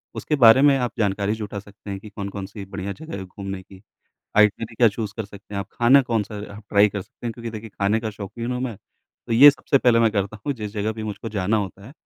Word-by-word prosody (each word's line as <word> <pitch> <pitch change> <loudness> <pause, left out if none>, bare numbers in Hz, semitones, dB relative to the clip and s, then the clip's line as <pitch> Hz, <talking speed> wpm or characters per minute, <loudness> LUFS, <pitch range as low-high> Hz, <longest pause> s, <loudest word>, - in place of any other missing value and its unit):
उसके 150 - -1
बारे 125 -1 +7
में 140 -1 +6
आप 125 -2 -1
जानकारी 100 -1 +1
जुटा 105 -2 -5
सकते 100 +1 -13
हैं 100 -1 -4
कि 105 - -11
कौन-कौन 100 -1 -6
सी 100 0 -9
बढ़िया 95 0 -5
जगह 160 -3 -8
है 95 - -5
घूमने 95 0 -7
की। 95 0 -16 0.6
आइटिनरी 105 +2 +3
क्या 115 +1 +5
चूज़ 105 0 -4
कर 110 - -3
सकते 100 0 -12
हैं - - -1
आप। 100 - -7
ख़ाना 130 +4 +5
कौन-सा 110 -4 -2 0.2
आप 105 - -11
ट्राई 100 +1 +5
कर 100 -1 -5
सकते 120 - -11
हैं, 115 - -2
क्योंकि 115 0 -7
देखिए, 110 0 -8
ख़ाने 100 +3 0
का 110 -1 -3
शौकीन 110 +4 -5
हूँ 125 - -3
मैं 120 -5 -3 0.5
तो 120 - -3
ये 135 +6 +10
सबसे 140 -1 +1
पहले 120 -3 +4
मैं 115 -1 +4
करता 100 0 -2
हूँ 145 - +1
जिस 105 -4 -6
जगह 105 0 -1
भी 110 0 -7
मुझको 110 +1 -5
जाना 105 0 0
होता 100 -1 -4
है, 130 - -12
105 Hz, 255 wpm, -23 LUFS, 100-115 Hz, 0.6 s, ये